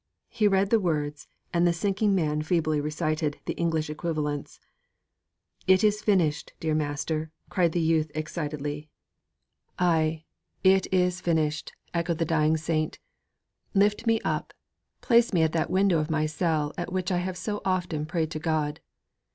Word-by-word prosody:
He 220 -3 +2
read 195 0 +2
the 230 - +5
words 150 -5 -2 0.3
and 175 0 +3
the - - +4
sinking 200 +3 +1
man 150 -4 +1
feebly 155 -2 +1
recited 155 0 -1
the - - -2
English 160 -2 0
equivalents. 150 -2 -3 1.1
'It 190 +1 +5
is 210 0 +3
finished, 175 -8 +1
dear 160 -1 -1
master!' 155 +1 -1 0.2
cried 175 -4 +2
the 175 - +1
youth 160 -1 +2
excitedly. 150 -1 -4 0.9
'Ay, 160 -2 +1 0.4
it 190 0 +4
is 180 -1 +2
finished!' 155 -3 0 0.2
echoed 170 -1 0
the 165 - 0
dying 155 0 +2
saint; 155 0 -1 0.8
'lift 205 +3 +2
me 225 -1 +4
up, - - -3 0.5
place 235 -3 +4
me 170 -3 +4
at 160 - +2
that 160 -1 0
window 185 -3 +3
of 155 +1 -2
my 155 -1 +1
cell 155 -1 0
at 175 +1 -4
which 185 0 -1
I 180 - +2
have 180 0 -3
so 210 +2 -3
often 175 -5 -1
prayed 160 -1 -1
to 155 - -3
God. 155 -1 -1
160 Hz, 155 wpm, -27 LUFS, 155-185 Hz, 1.1 s, the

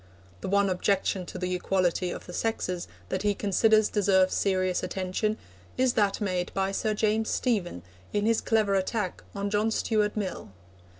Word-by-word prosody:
The - - -5
one 200 +1 +3
objection 190 0 0
to - - -7
the 180 0 -2
equality 180 -1 0
of - - -6
the 180 - -9
sexes 185 -4 -2 0.2
that - - -1
he 205 -1 +1
considers 215 +2 +3
deserves 190 -2 +3
serious 185 -2 +1
attention 195 +3 -2 0.4
is 255 -1 +3
that 205 -3 +1
made 185 -4 -1
by 195 0 +1
Sir 215 +2 -1
James 220 +1 +1
Stephen 195 - -1 0.3
in 205 0 0
his 225 0 +2
clever 215 -3 +2
attack 195 0 -1
on 200 0 -2
John 210 +1 +2
Stuart 215 -1 0
Mill. 200 -3 -4
200 Hz, 165 wpm, -27 LUFS, 185-215 Hz, 0.4 s, one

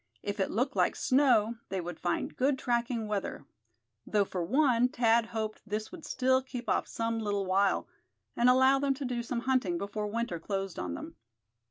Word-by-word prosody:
If 205 0 -3
it 190 - +1
looked 255 +6 -1
like - - +2
snow 245 -5 +3
they 190 0 -2
would 175 -1 -6
find 175 - -2
good 265 +1 +2
tracking 235 -2 -1
weather; 200 -8 -3 0.6
though 205 -2 +1
for 180 -2 -3
one 250 - +3
Thad 230 -2 +2
hoped 220 -1 -4
this 215 +1 -4
would 355 -3 -10
still 260 0 +2
keep 250 -2 -7
off - - +1
some 230 0 -2
little 205 -2 -1
while, 195 +1 +2 0.5
and 240 +1 +4
allow 260 +2 +5
them 275 -1 +1
to 275 0 -5
do 245 -1 -2
some 235 0 -3
hunting 245 -9 +1
before 200 +3 -3
winter 220 -5 -2
closed 195 +1 -3
on 90 -1 -3
them. - - -8
230 Hz, 185 wpm, -30 LUFS, 200-255 Hz, 0.6 s, allow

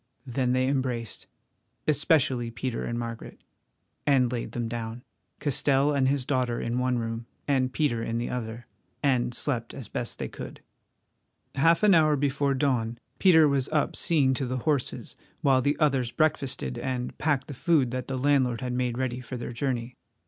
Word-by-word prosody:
Then 125 0 0
they 130 0 +2
embraced—especially 130 +1 -1
Peter 120 +1 -3
and 120 - -3
Margaret—and 120 +2 -3
laid 120 -2 -4
them 120 -1 -2
down, 115 +1 -5 0.4
Castell 140 0 +2
and 135 -2 +2
his 135 -1 0
daughter 125 -4 0
in 120 +2 -1
one 125 -1 +1
room, 115 0 -4 0.2
and 130 -3 +2
Peter 130 -6 0
in 115 0 -2
the 120 - -2
other, 115 -1 -5 0.4
and 125 -3 +2
slept 120 -5 -2
as 130 -6 -8
best 120 - -4
they - - -3
could. - - -9 0.9
Half 165 +7 +3
an 210 -2 +7
hour 155 -3 +5
before 140 0 +1
dawn 125 -4 0 0.2
Peter 160 -5 +6
was 140 -2 +1
up 155 -2 0
seeing 140 -6 +2
to 130 0 -2
the 130 +1 -2
horses 145 -5 -1 0.2
while 135 -2 +4
the 145 +3 +1
others 135 -6 +2
breakfasted 130 - 0
and 125 -1 -3
packed 145 -4 +1
the 145 - -7
food 140 -2 +2
that 130 0 -3
the 135 - -2
landlord 130 -3 +2
had 125 -1 -2
made 125 -1 -1
ready 130 -1 -2
for 125 +1 -6
their 120 0 -5
journey. 125 -1 -2
130 Hz, 165 wpm, -27 LUFS, 120-140 Hz, 0.9 s, an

